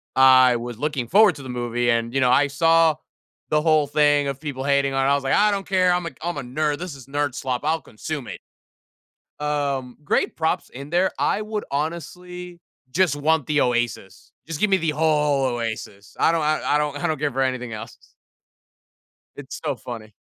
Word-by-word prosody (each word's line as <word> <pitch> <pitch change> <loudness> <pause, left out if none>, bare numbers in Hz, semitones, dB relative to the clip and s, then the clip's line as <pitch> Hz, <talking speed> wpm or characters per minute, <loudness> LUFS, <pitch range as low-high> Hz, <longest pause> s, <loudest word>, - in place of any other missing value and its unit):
I 130 -2 +6
was 120 -1 -6
looking 140 -3 -2
forward 200 - +5
to 140 - -10
the 130 - -8
movie, 120 0 -1
and, 115 0 0
you 135 - +1
know, 125 -1 +3
I 145 +3 +4
saw 165 +2 +3 0.5
the 150 0 +2
whole 155 -2 +3
thing 145 -1 +3
of 140 -1 -4
people 140 -3 -5
hating 140 -1 +1
on 135 0 +1
it, - - +3
I 140 - +4
was 140 - -2
like, 135 - 0
"I 210 +1 +4
don't 200 -1 -2
care! 185 -1 +3
I'm 175 -1 0
a - - -2
c 140 - -23
I'm 175 -2 -3
a 140 - -4
nerd. 145 +4 -1
This 175 -2 -6
is 135 -2 -13
nerd 145 -1 -1
slop. 125 -1 -3
I'll 160 +1 +1
consume 135 +3 -6
it." - - -7 1.0
Um, 140 -4 -2
great - - 0
props 160 0 -1
in 140 +3 -9
there. 180 +3 +2
I 210 - +1
would 215 0 -4
honestly 175 +4 -5 0.3
just 155 0 +1
want 155 0 +1
the 150 -1 +1
OASIS. 120 -6 -2 0.2
Just 160 -2 -5
give 210 - +3
me 195 - +4
the 165 -3 -1
whole 150 -2 +2
OASIS. 110 -3 -6
I - - +5
don't 165 - 0
I 155 0 +1
I 145 - +2
don't 150 -1 -1
I 175 - -3
don't 155 -3 -2
care 145 -1 0
for 135 - 0
anything 125 -3 -2
else. 105 - -8 1.4
It's 140 -1 -8
so 145 -3 -1
funny. 115 -4 -9
145 Hz, 210 wpm, -23 LUFS, 130-160 Hz, 1.4 s, I